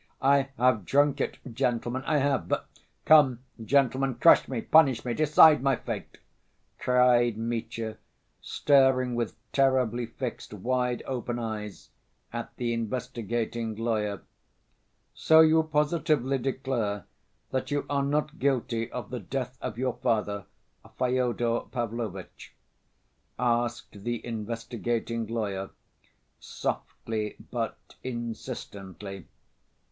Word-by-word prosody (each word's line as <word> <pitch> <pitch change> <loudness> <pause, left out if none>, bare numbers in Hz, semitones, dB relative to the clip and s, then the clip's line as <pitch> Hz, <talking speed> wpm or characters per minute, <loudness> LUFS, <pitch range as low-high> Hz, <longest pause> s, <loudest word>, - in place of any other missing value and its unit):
"I 140 0 +3
have 125 -4 +3
drunk 145 +5 +2
it, - - -2 0.2
gentlemen, 120 +2 -1
I 155 - +3
have... 140 -1 +1
but... - - -1 0.4
come, 140 -6 +6 0.2
gentlemen, 135 +1 +2
crush 165 +8 +6
me, 130 -3 -3
punish 140 -5 +4
me, 120 - -1
decide 155 0 +6
my 135 0 +3
fate!" - - -6 0.6
cried 125 -2 +4
Mitya, 115 -1 -3 0.4
staring 130 -3 +3
with 120 -2 -2 0.2
terribly 125 -4 +2
fixed 120 -2 -6
wide‐ 125 -1 0
open 125 -2 -3
eyes 110 -3 -6 0.4
at - - -4
the 120 -1 -1
investigating 115 -1 -3
lawyer. 105 -3 -1 0.9
"So 160 0 +6
you 160 0 +6
positively 150 -3 +1
declare 120 -6 -2 0.5
that 130 - -2
you 145 0 -1
are 140 -1 0
not 150 +3 -1
guilty 120 -4 0
of 125 -3 -6
the 125 - -3
death 125 +4 -4
of 120 -3 -4
your 130 0 0
father, 105 -4 0 0.5
Fyodor 125 -2 +1
Pavlovitch?" 115 -6 -5 0.8
asked 120 -4 -1
the 120 0 -3
investigating 115 0 -3
lawyer, 100 -4 -3 0.7
softly 110 -2 -4 0.2
but - - -2 0.3
insistently. 105 - -6
120 Hz, 110 wpm, -28 LUFS, 115-135 Hz, 0.9 s, come